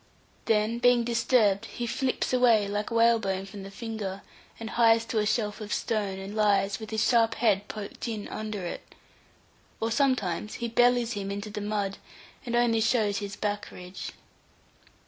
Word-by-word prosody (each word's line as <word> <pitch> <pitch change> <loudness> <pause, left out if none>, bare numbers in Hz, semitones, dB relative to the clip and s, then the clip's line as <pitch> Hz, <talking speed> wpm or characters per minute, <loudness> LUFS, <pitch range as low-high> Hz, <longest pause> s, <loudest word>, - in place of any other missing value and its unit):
Then 220 +1 +1
being 245 -1 +4
disturbed 230 -4 +2
he 240 - -5
flips 255 +2 -1
away, 235 -5 +4
like 205 +1 -2
whalebone 225 -5 +2
from 200 0 -9
the 195 - -8
finger, 205 -3 -5 0.4
and 225 -1 -6
hies 230 -1 +4
to 225 -1 -1
a 210 - +1
shelf 215 -1 -1
of 210 -1 -7
stone, 205 -4 -1
and 195 +1 -7
lies 200 -2 +2
with 220 -1 -8
his 220 -1 +1
sharp 230 -2 +3
head 205 -3 +2
poked 210 +3 -6
in 215 -3 -4
under 215 -3 -4
it; 175 - -7 0.8
or 225 +1 -1
sometimes 215 -7 0
he 235 - -3
bellies 245 0 +3
him 200 -2 -4
into 205 +1 -5
the 210 0 -4
mud, 205 -1 -2 0.5
and 240 - -1
only 235 -2 +3
shows 215 -3 +2
his 205 0 -5
back 205 -1 -3
ridge. 180 +1 -8
215 Hz, 165 wpm, -28 LUFS, 205-230 Hz, 0.8 s, being